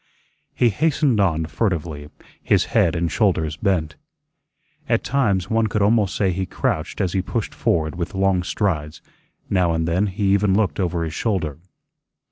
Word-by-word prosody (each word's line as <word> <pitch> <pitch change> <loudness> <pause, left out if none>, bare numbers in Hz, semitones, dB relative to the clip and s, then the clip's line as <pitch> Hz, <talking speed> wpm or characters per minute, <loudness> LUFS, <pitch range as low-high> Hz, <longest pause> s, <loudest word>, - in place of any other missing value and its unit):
He 120 - +3
hastened 140 -1 +1
on 80 -5 +1
furtively, 80 -4 -2 0.3
his - - +2
head - - +3
and 85 0 -1
shoulders 75 0 +1
bent. 85 -5 -1 0.9
At 115 -2 +2
times 100 -10 +1
one 110 0 +1
could 105 0 0
almost 105 -2 +2
say 95 -2 +1
he 95 +1 -3
crouched 80 +2 -2
as 95 -4 0
he 95 - +1
pushed 110 +3 -3
forward 80 -2 0
with 85 +3 -5
long 95 -1 +2
strides; 85 -6 -2 0.4
now 90 -3 +2
and 80 0 -1
then 90 +5 +1
he 95 0 0
even 100 -1 +2
looked 105 -2 0
over 85 -2 -1
his 80 -1 -4
shoulder. 85 - -2
95 Hz, 160 wpm, -22 LUFS, 80-105 Hz, 0.9 s, He